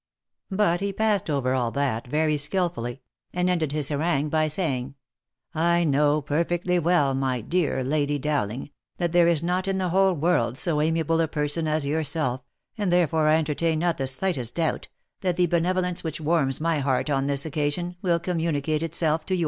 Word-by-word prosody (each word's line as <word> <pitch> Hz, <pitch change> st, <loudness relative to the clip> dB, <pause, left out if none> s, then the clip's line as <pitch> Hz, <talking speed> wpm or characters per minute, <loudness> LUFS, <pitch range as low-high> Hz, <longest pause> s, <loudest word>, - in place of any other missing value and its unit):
But 190 Hz, -3 st, +1 dB
he 200 Hz, 0 st, -1 dB
passed 210 Hz, -3 st, 0 dB
all 140 Hz, -2 st, +1 dB
that 130 Hz, +1 st, +1 dB, 0.5 s
over -, -, -14 dB
very 155 Hz, 0 st, +2 dB
skilfully, 145 Hz, -5 st, 0 dB, 0.3 s
and 180 Hz, 0 st, 0 dB
ended 165 Hz, -5 st, 0 dB
his 150 Hz, -2 st, -1 dB
harangue 150 Hz, 0 st, 0 dB
by 155 Hz, 0 st, +1 dB
saying, 140 Hz, -5 st, -2 dB, 0.3 s
" 130 Hz, +6 st, -55 dB, 0.2 s
I 170 Hz, 0 st, +3 dB
know 150 Hz, 0 st, +2 dB
perfectly 175 Hz, +4 st, 0 dB
well, 165 Hz, -5 st, +2 dB
my 130 Hz, -2 st, -1 dB
dear 160 Hz, -1 st, 0 dB
lady 145 Hz, +1 st, 0 dB
Dowling, 140 Hz, -3 st, -2 dB, 0.3 s
that 175 Hz, -2 st, -1 dB
there 175 Hz, 0 st, +4 dB
is 165 Hz, -2 st, +2 dB
not 180 Hz, +2 st, -1 dB
in 195 Hz, 0 st, 0 dB
the 185 Hz, -1 st, -1 dB
whole 190 Hz, +2 st, +3 dB
world 160 Hz, -6 st, +1 dB
so 150 Hz, -1 st, 0 dB
amiable 165 Hz, +1 st, +1 dB
a 165 Hz, -, +1 dB
person 150 Hz, +1 st, -1 dB
as 155 Hz, -1 st, 0 dB
yourself, 145 Hz, -3 st, -1 dB, 0.4 s
and 200 Hz, -4 st, 0 dB
therefore 160 Hz, -3 st, +2 dB
I 155 Hz, -, +5 dB
enter 155 Hz, -1 st, 0 dB
tain 165 Hz, +1 st, 0 dB
not 170 Hz, -1 st, 0 dB
the 135 Hz, -, -1 dB
slightest 130 Hz, -3 st, -2 dB
doubt, 165 Hz, -2 st, -1 dB, 0.3 s
that 180 Hz, -3 st, -1 dB
the 180 Hz, -, +4 dB
benevolence 180 Hz, +1 st, 0 dB
which 160 Hz, -1 st, -4 dB
warms 150 Hz, -4 st, +1 dB
my 165 Hz, -1 st, 0 dB
heart 135 Hz, +1 st, 0 dB
on 135 Hz, 0 st, +1 dB
this 140 Hz, 0 st, +1 dB
occasion, 155 Hz, +4 st, -2 dB
will 175 Hz, -4 st, +2 dB
communicate 160 Hz, -3 st, -1 dB
itself 160 Hz, -1 st, 0 dB
to 185 Hz, -, +1 dB
yours." -, -, -2 dB
160 Hz, 190 wpm, -25 LUFS, 145-175 Hz, 0.5 s, I